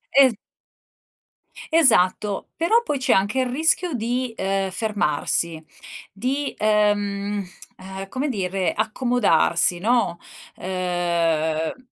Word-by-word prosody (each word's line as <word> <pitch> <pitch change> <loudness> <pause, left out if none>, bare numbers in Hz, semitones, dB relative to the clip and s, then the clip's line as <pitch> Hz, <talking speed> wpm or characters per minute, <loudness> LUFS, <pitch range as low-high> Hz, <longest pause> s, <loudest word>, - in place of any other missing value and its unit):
Es 265 -3 +6 1.4
Esatto. 210 - +3
Però 445 +9 +2
poi, 290 - -2
c'è 260 - +2
anche 205 +7 +1
il 255 - +1
rischio 320 +3 +1
di, 245 +2 -2
ehm, 195 0 -1
fermarsi 170 -5 -1 0.5
di, 265 +8 -3
ehm, 205 -1 0 0.3
ehm, 190 +1 -8
come 275 +3 -2
dire, 190 -4 -1
accomodarsi, 215 -7 +1
no, 215 -5 +1 0.4
ehm 170 +1 -1
205 Hz, 95 wpm, -22 LUFS, 180-250 Hz, 1.4 s, Es